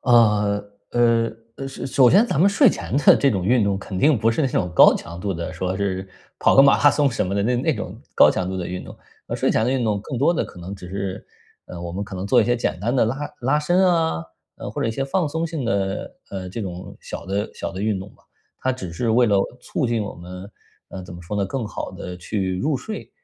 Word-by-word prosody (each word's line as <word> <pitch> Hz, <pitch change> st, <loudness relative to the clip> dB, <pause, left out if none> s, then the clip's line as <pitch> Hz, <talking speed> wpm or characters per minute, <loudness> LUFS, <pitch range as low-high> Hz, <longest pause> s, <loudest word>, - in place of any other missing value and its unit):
呃， 105 Hz, -4 st, +3 dB, 0.3 s
呃， 115 Hz, -1 st, +3 dB, 0.3 s
呃 135 Hz, -, -5 dB
是 135 Hz, -, -6 dB
首 130 Hz, -1 st, +5 dB
先 205 Hz, +7 st, +5 dB
咱 155 Hz, -, 0 dB
们 195 Hz, -, +6 dB
睡 200 Hz, -, +5 dB
前 -, -, -3 dB
的 140 Hz, -, +7 dB
这 140 Hz, -, +3 dB
种 95 Hz, -4 st, -1 dB
运 120 Hz, +3 st, +3 dB
动 100 Hz, -1 st, 0 dB
肯 95 Hz, -1 st, -6 dB
定 145 Hz, -1 st, +4 dB
不 115 Hz, +2 st, +2 dB
是 115 Hz, -, -1 dB
那 135 Hz, -, +2 dB
种 90 Hz, -7 st, -1 dB
高 -, -, +8 dB
强 85 Hz, +1 st, -7 dB
度 100 Hz, +1 st, -2 dB
的， 85 Hz, +2 st, -4 dB
说 90 Hz, +2 st, -3 dB
是 95 Hz, -1 st, -2 dB, 0.3 s
跑 -, -, +4 dB
个 135 Hz, -, +9 dB
马 140 Hz, -, +5 dB
拉 145 Hz, -, +8 dB
松 145 Hz, -1 st, +2 dB
什 115 Hz, -, -1 dB
么 95 Hz, -, -2 dB
的 100 Hz, -, +1 dB
那 120 Hz, +3 st, +1 dB
那 140 Hz, +4 st, +1 dB
种 105 Hz, -, -7 dB
高 -, -, +7 dB
强 90 Hz, -, -2 dB
度 95 Hz, -, -3 dB
的 90 Hz, -, -3 dB
运 90 Hz, 0 st, -5 dB
动。 -, -, -11 dB, 0.3 s
呃， -, -, -3 dB
睡 -, -, +1 dB
前 110 Hz, -, +2 dB
的 125 Hz, -, +1 dB
运 130 Hz, -2 st, 0 dB
动 105 Hz, -2 st, 0 dB
更 125 Hz, +1 st, -5 dB
多 155 Hz, +6 st, +3 dB
的 -, -, 0 dB
可 -, -, -12 dB
能 90 Hz, +3 st, -7 dB
只 90 Hz, -2 st, -10 dB
是， 95 Hz, 0 st, -4 dB, 0.4 s
呃， 85 Hz, -, -8 dB
我 85 Hz, -1 st, -5 dB
们 100 Hz, -, -3 dB
可 95 Hz, -, -8 dB
能 95 Hz, -, -4 dB
做 120 Hz, +3 st, +5 dB
一 -, -, 0 dB
些 120 Hz, +2 st, +1 dB
简 105 Hz, -6 st, -2 dB
单 120 Hz, +5 st, 0 dB
的 125 Hz, -, +4 dB
拉 125 Hz, +6 st, -2 dB, 0.2 s
拉 135 Hz, +5 st, +2 dB
伸 180 Hz, +5 st, +3 dB
啊， 165 Hz, -, +1 dB, 0.5 s
或 -, -, -3 dB
者 -, -, 0 dB
一 -, -, 0 dB
些 135 Hz, +4 st, -2 dB
放 155 Hz, +3 st, 0 dB
松 160 Hz, +3 st, -2 dB
性 160 Hz, -5 st, -4 dB
的， 100 Hz, -4 st, -2 dB, 0.2 s
呃， 95 Hz, -2 st, -5 dB
这 105 Hz, +5 st, -6 dB
种 90 Hz, -1 st, -7 dB
小 -, -, -8 dB
的 100 Hz, +2 st, -2 dB
小 -, -, -5 dB
的 95 Hz, -, -6 dB
运 105 Hz, -2 st, 0 dB
动 95 Hz, -, -8 dB
吧。 -, -, -27 dB, 0.4 s
它 130 Hz, -, +1 dB
只 95 Hz, -9 st, -7 dB
是 115 Hz, +6 st, -1 dB
为 120 Hz, +2 st, +4 dB
了 100 Hz, -2 st, +3 dB, 0.2 s
促 135 Hz, 0 st, -2 dB
进 115 Hz, -2 st, 0 dB
我 100 Hz, -, -6 dB
们， 90 Hz, +3 st, -10 dB, 0.4 s
呃， 95 Hz, -, -8 dB
怎 90 Hz, -1 st, -10 dB
么 85 Hz, -, -10 dB
说 85 Hz, +5 st, -6 dB
呢， 100 Hz, -, 0 dB
更 115 Hz, +2 st, -3 dB
好 -, -, -5 dB
地 90 Hz, 0 st, -7 dB
去 95 Hz, 0 st, -2 dB
入 145 Hz, +6 st, 0 dB
睡。 215 Hz, -, -7 dB
105 Hz, 285 characters per minute, -22 LUFS, 95-135 Hz, 0.5 s, 个